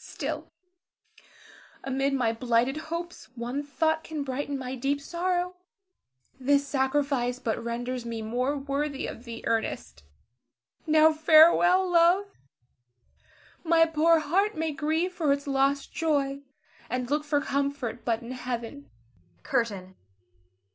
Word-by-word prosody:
Still - - -5 1.3
amid 270 +1 0
my 240 -4 +1
blighted 240 +3 +1
hopes 340 -5 -5
one 245 +4 -3
thought 315 +2 0
can 310 -3 -4
brighten 280 +1 -3
my 255 -1 -5
deep 275 +2 -1
sorrow, 355 +3 -2 0.8
this 280 +2 +2
sacrifice 265 -2 0
but 230 -2 -3
renders 245 +1 -3
me 230 -1 -5
more 250 +6 -1
worthy 280 0 -2
of 235 - -8
thee, 230 -1 -8
Ernest. 225 - -2 0.9
Now 315 0 +5
farewell, 335 +4 +6
love; 350 +3 +4 1.4
my 330 -1 +5
poor 325 +1 +3
heart 365 +8 +1
may 320 0 -1
grieve 320 +4 -1
for 315 -5 +1
its 280 0 0
lost 275 0 0
joy, 280 -4 0 0.5
and 250 0 -2
look 300 +1 +1
for 290 -1 +1
comfort 280 -4 -2
but 230 0 -1
in 235 - -8
Heaven. 250 +2 -5 0.5
CURTAIN. 195 -5 -2
280 Hz, 120 wpm, -27 LUFS, 250-315 Hz, 1.4 s, farewell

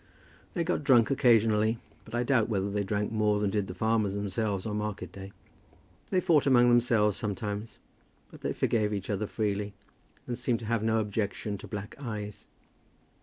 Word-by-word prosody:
They 170 - +1
got 165 -3 -1
drunk 125 -3 +5
occasionally, 115 -4 +4 0.3
but 110 - -7
I 120 - +1
doubt 120 -4 +2
whether 100 -2 0
they 105 0 0
drank 105 +2 -1
more 105 -1 +2
than 105 -1 0
did 105 -2 0
the 90 - -7
farmers 110 -1 +1
themselves 100 -1 -2
on 105 -1 -2
market 105 -4 -4
day. 95 0 -9 0.8
They 185 - +2
fought 155 -5 +3
among 120 -2 +6
themselves 115 -4 +3
sometimes, 105 0 -4 0.5
but - - -13
they - - -1
forgave 105 -2 +1
each 100 +1 -4
other 105 +1 -1
freely, 105 -2 -2 0.5
and 120 0 -4
seemed 120 -1 +1
to - - -6
have 115 0 0
no 110 0 +2
objection 105 -1 -2
to - - -9
black 105 0 -6
eyes. 105 -5 -6
105 Hz, 175 wpm, -29 LUFS, 105-115 Hz, 0.8 s, among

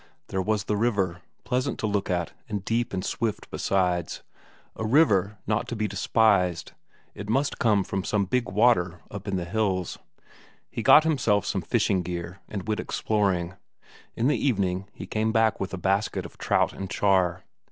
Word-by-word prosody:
There 95 - -1
was 105 +1 0
the 105 - -1
river; 100 -6 0 0.2
pleasant 125 +1 -1
to - - -2
look 100 -2 -1
at, 90 -2 -1 0.2
and 100 -2 -3
deep 120 +2 0
and 95 -1 -3
swift 115 -3 -3
besides; 90 -3 0 0.5
a - - -4
river 110 - +3
not 110 0 0
to 120 - -4
be 110 -1 -1
despised; 100 -3 +2 0.4
it 105 +1 -8
must 135 +5 0
come 105 -5 +3
from 95 0 -3
some 100 +1 0
big 120 +2 0
water 95 -5 +2
up 100 0 -7
in 100 - -1
the 90 -2 -2
hills. 95 -1 -1 0.7
He - - -3
got 155 - +7
himself 120 - +2
some 95 - -1
fishing 100 0 +1
gear 90 +1 -5
and 100 -2 -5
went 110 -1 -1
exploring; 95 -5 0 0.6
in 115 - -1
the 150 - +1
evening 100 -7 0
he - - -8
came 110 +1 0
back 110 -1 +2
with 95 - -3
a 95 - -4
basket 95 +3 0
of - - -12
trout - - +1
and 95 -1 -6
char. 95 -3 +2
100 Hz, 175 wpm, -26 LUFS, 95-110 Hz, 0.7 s, got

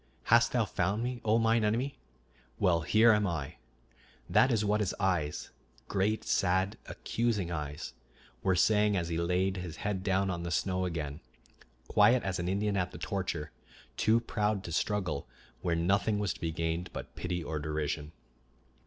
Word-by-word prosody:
"Hast 115 0 +6
thou 120 -3 +2
found 100 +3 -1
me, 125 -1 -3
O 110 +1 +3
mine 115 0 +3
enemy? 120 +6 0 0.6
Well, 85 -4 +3
here 110 +7 +5
am 105 -2 +3
I." 80 -6 -4 0.7
That 130 - +4
is 110 -3 +1
what 105 +1 +2
his 105 -3 -1
eyes, 90 -6 -1 0.4
great, 105 +2 0
sad, 95 +2 +1
accusing 110 -7 -1
eyes, 75 -3 -5 0.5
were 95 - +2
saying 105 +2 +3
as 85 -2 -2
he 85 0 -1
laid 90 +3 +1
his 90 -3 -5
head 100 -2 -1
down 95 0 +1
on 85 -1 -3
the 85 - -4
snow 95 +1 0
again, 80 -4 -4 0.7
quiet 115 +4 +5
as 95 -2 -2
an 90 - -2
Indian 100 +1 0
at 90 -1 0
the - - -10
torture, 85 -6 -3 0.4
too 110 +2 +3
proud 105 -3 -1
to 85 - -6
struggle 90 -4 -1 0.3
where 85 -2 0
nothing 100 +5 +2
was 105 -2 0
to - - -15
be 80 - -1
gained 85 +2 -2
but - - -7
pity 90 -1 -3
or 75 0 -3
derision. 75 0 -3
95 Hz, 170 wpm, -31 LUFS, 85-105 Hz, 0.7 s, Hast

